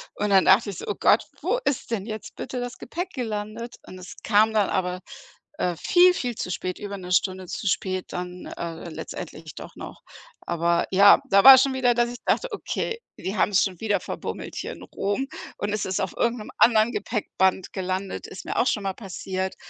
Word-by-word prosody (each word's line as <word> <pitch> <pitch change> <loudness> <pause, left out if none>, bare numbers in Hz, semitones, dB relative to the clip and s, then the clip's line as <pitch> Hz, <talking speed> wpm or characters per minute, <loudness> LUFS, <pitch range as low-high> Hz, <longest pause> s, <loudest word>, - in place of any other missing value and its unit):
und 210 - -1
dann 195 -1 +5
dachte 205 +3 +5
ich 195 - -6
so: - - -6
„Oh 205 - -1
Gott, 215 - +4 0.2
wo 405 +10 0
ist 265 -4 -1
denn 205 -4 -2
jetzt 215 -1 -7
bitte 255 - -5
das 245 0 -5
Gepäck 345 +9 -5
gelandet?“ 225 -1 -4
Und 185 - -11
es 180 - -10
kam 220 +1 +4
dann 210 -3 +2
aber, 180 -1 -1 0.6
äh, 180 - 0
viel, 360 - +5
viel 245 -9 -3
zu 180 - -4
spät, 185 0 -4
über 205 -1 -5
'ne 180 -1 -8
Stunde 185 0 +1
zu 200 - -4
spät 185 0 -1
dann, 180 0 -6
äh, 170 0 -6
letztendlich 155 - -8
doch - - -10
noch, - - -10 0.4
aber 170 0 +1
ja, 200 +2 +7
da 200 -3 +5
war 270 -1 +12
schon 265 +1 +3
wieder, 250 -2 +3
dass 240 0 +1
ich 245 - -9
dachte: - - +1
„Okay, 455 +2 -3 0.2
die 195 +3 -4
haben's 195 -2 +3
schon 185 -4 -3
wieder 215 -2 +1
verbummelt - - -6
hier - - -4
in - - -12
Rom 205 +7 -2 0.3
und 205 0 -2
es 210 - -1
ist 190 +1 -1
auf 190 -2 -2
irgend 235 +1 +1
'nem 210 - -9
anderen 225 0 +5
Gepäckband 190 -3 0
gelandet“, 190 0 -3
ist 190 - -10
mir - - -4
auch 250 - +3
schon 210 -5 0
mal 195 - -1
passiert, 190 -2 -4
205 Hz, 205 wpm, -25 LUFS, 185-235 Hz, 0.6 s, war